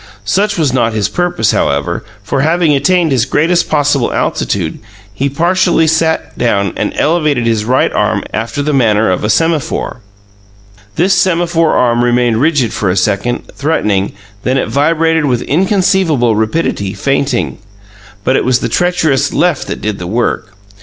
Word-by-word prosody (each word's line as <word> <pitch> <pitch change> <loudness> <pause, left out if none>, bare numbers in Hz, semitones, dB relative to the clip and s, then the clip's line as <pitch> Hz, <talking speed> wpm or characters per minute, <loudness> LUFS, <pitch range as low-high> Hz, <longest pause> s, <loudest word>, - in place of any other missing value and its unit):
Such 200 - 0
was 150 -6 +1
not 115 -3 +1
his 105 -2 0
purpose, 175 - 0
however, 70 +5 -1 0.2
for, 135 +6 -1
having 160 +1 +2
attained 160 +4 +2
his 125 -4 +2
greatest 165 +6 +1
possible 145 -4 +1
altitude, 85 -5 -2 0.3
he 135 +7 -1
partially 170 +3 +2
sat 160 0 0
down 100 -6 0
and - - -2
elevated 150 -6 +1
his 110 -2 0
right 125 +3 +1
arm - - 0
after 115 +5 -3
the 150 +1 -1
manner 110 -6 +2
of 90 - -2
a 105 - 0
semaphore. 155 -1 -1 0.9
This 190 +3 +2
semaphore 170 -2 +1
arm 120 -1 +2
remained 120 -1 +1
rigid 145 -7 +1
for 100 - -1
a 90 - 0
second, 100 +6 -1
threatening; 105 -10 -1 0.3
then 130 +4 0
it - - -1
vibrated 160 +2 +1
with 125 -4 0
inconceivable 180 - +1
rapidity, 110 -3 -1
feinting. 135 -5 -1 0.6
But 130 - +1
it - - +1
was 130 -1 +2
the - - -3
treacherous 160 -6 +1
left 175 -5 0
that - - -5
did 105 -2 -3
the 90 - -5
work. 110 -1 -2
135 Hz, 155 wpm, -13 LUFS, 115-165 Hz, 0.9 s, having